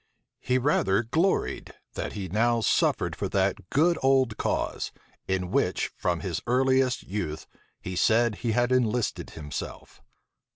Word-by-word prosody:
He 125 - +1
rather 120 -6 +2
gloried, 165 +12 0 0.2
that - - -4
he 100 -2 -4
now 115 +5 +2
suffered - - +1
for - - -3
that - - 0
"good 165 +4 +3
old 130 -4 +3
cause," - - -2 0.4
in 95 -1 -1
which, - - 0
from 85 -2 -1
his 90 -5 -3
earliest 130 0 +2
youth, 90 -6 -4 0.3
he 95 - -6
said 110 +3 +3
he 115 -3 -1
had 120 +2 +1
enlisted 125 -2 0
himself. 75 -3 -7
115 Hz, 135 wpm, -27 LUFS, 95-130 Hz, 0.4 s, good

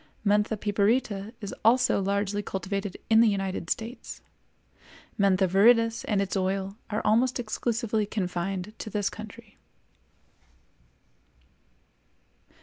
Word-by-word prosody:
Mentha 210 +2 +2
piperita 205 0 0
is 200 - -5
also 230 -2 +4
largely 200 +1 -1
cultivated 195 0 -4
in 225 0 +6
the 230 - +5
United 195 -4 -2
States. 230 +3 -4 1.0
Mentha 195 -1 +3
viridis 230 +4 +4
and 210 -3 +1
its 195 - -4
oil 195 +1 -1
are 210 0 -2
almost 240 +4 +2
exclusively 225 -1 -1
confined 190 0 -3
to - - -5
this 205 -1 -1
country. 220 0 -11
205 Hz, 105 wpm, -27 LUFS, 195-220 Hz, 1.0 s, in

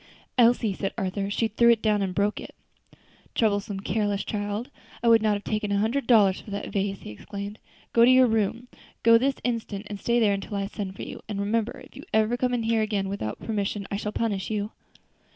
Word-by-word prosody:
"Elsie," 235 -3 +4
said 195 +1 -4
Arthur; 195 -1 -2
"she 225 +3 +1
threw 235 +2 +3
it 230 -2 +5
down 210 -2 +2
and 190 -2 -2
broke 205 +1 +1
it." - - -10 0.8
"Troublesome, 205 -3 0
careless 205 0 0
child! 205 +4 -3 0.3
I - - +2
would 230 -1 +6
not 215 -1 +2
have 205 - -5
taken 215 -1 -2
a 200 - +2
hundred 230 +6 0
dollars 205 -6 +5
for - - -13
that 200 0 -4
vase," 195 -1 -1
he - - -8
exclaimed. 200 - -7 0.3
"Go 235 - +6
to 240 - +7
your 255 0 +7
room! 225 +1 0 0.4
go 230 0 +7
this 270 +2 +1
instant, 225 -4 -3
and 205 - -5
stay 240 0 +2
there 210 -3 +4
until 200 +1 -4
I 195 - -1
send 195 -1 -5
for - - -7
you; - - -8
and 205 -2 -3
remember, 220 +3 -1
if - - -20
you 275 - -9
ever 220 +2 +3
come 250 0 0
in 235 - -1
here 225 0 +2
again 205 -3 -1
without 150 - -4
permission 205 -2 -2
I 200 - -1
shall 210 0 -3
punish 210 -4 -2
you." 210 0 -2
210 Hz, 220 wpm, -26 LUFS, 200-230 Hz, 0.8 s, to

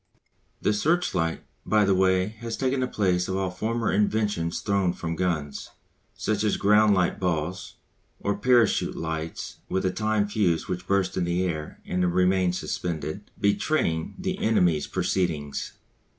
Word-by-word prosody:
The 105 - +3
searchlight, 105 - 0 0.2
by 105 -1 +3
the 100 - +3
way, 95 0 +3
has 115 -2 -4
taken 130 +2 0
the 130 - 0
place 90 -6 +1
of 95 0 -1
all 95 -1 -1
former 110 +4 -1
inventions 105 -5 0
thrown 100 -4 +1
from 85 -2 -4
guns, 80 -5 -2 0.5
such 105 -1 -1
as 105 - +1
ground 105 +1 +5
light 90 -2 +1
balls, 85 -1 -2 0.4
or 100 0 -1
parachute 120 +1 +3
lights 80 0 -4
with 95 - 0
a 95 - +2
time 110 0 0
fuse 100 -6 +1
which 90 0 -4
burst 95 -2 +1
in 90 - +1
the 85 +1 0
air 80 -4 -4
and 90 -1 0
remained 90 -1 +3
suspended, 85 +2 -4
betraying 100 - 0
the 190 0 -3
enemy's 90 -8 +2
proceedings. 80 -6 -1
95 Hz, 150 wpm, -26 LUFS, 85-105 Hz, 0.5 s, ground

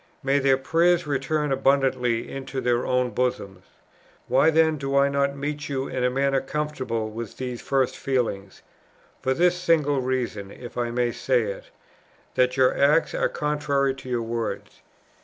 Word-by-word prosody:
May 135 +1 +2
their 135 -1 +3
prayers 170 +5 +2
return 150 +1 -1
abundantly 135 -3 +1
into 135 0 -5
their 120 -1 0
own 125 -1 +1
bosoms.... 100 -7 -2 0.6
Why 135 +5 +4
then 160 -1 +3
do 135 0 -1
I 140 0 +4
not 140 0 0
meet 145 +1 -4
you 135 -1 -2
in 130 -1 -3
a 125 - +3
manner 135 +1 +1
conformable 130 -7 -3
with 115 -1 -7
these 125 -2 -5
first 135 -2 0
feelings? 110 -8 -2 0.6
For 130 0 0
this 180 +4 +3
single 155 -6 +2
reason, 125 -6 -2
if 120 +4 -10
I 120 -1 -1
may 120 0 0
say - - +1
it, - - -5 0.7
that 125 +1 +2
your 130 -1 +4
acts 145 +4 +3
are - - +1
contrary 145 -2 0
to 135 -1 -11
your 120 -2 -1
words. 115 0 -4
135 Hz, 160 wpm, -24 LUFS, 125-145 Hz, 0.7 s, Why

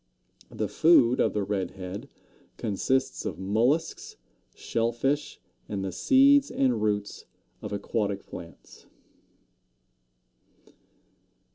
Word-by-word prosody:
The - - -3
food 130 -6 +4
of - - +2
the 105 - -1
Red 95 -3 -2
head 95 +2 -7 0.5
consists 130 +6 -1
of - - -4
mollusks, 145 - 0 0.4
shell 115 0 -1
fish, 140 +5 -2 0.3
and 100 -2 -3
the 95 - -3
seeds 275 - +4
and 125 -5 +1
roots 105 -1 -2 0.4
of - - -6
aquatic 100 0 -2
plants. 85 -1 -12
115 Hz, 100 wpm, -27 LUFS, 100-140 Hz, 0.5 s, food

